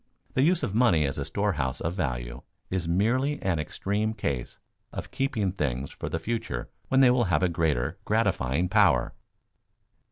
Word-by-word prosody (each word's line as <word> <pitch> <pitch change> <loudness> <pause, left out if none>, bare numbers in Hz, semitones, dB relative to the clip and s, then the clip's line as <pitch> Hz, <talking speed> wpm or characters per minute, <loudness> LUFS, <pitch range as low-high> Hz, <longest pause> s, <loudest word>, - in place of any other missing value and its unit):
The 130 - +2
use 170 +4 +3
of 100 - -1
money 105 -10 +4
as 70 - -2
a - - -2
storehouse 65 0 -1
of 85 - -2
value - - -3 0.3
is 90 -3 -1
merely 120 - +1
an 90 -4 +1
extreme 105 +7 -2
case 65 - -3 0.3
of - - -7
keeping 115 -9 0
things 70 -7 -2
for - - -6
the - - -1
future 80 - -3 0.2
when 135 0 +4
they 125 -2 +7
will 125 -1 +3
have 90 -2 +1
a - - +5
greater 80 -7 0
gratifying 70 +8 +1
power. - - +3
90 Hz, 165 wpm, -27 LUFS, 70-115 Hz, 0.3 s, they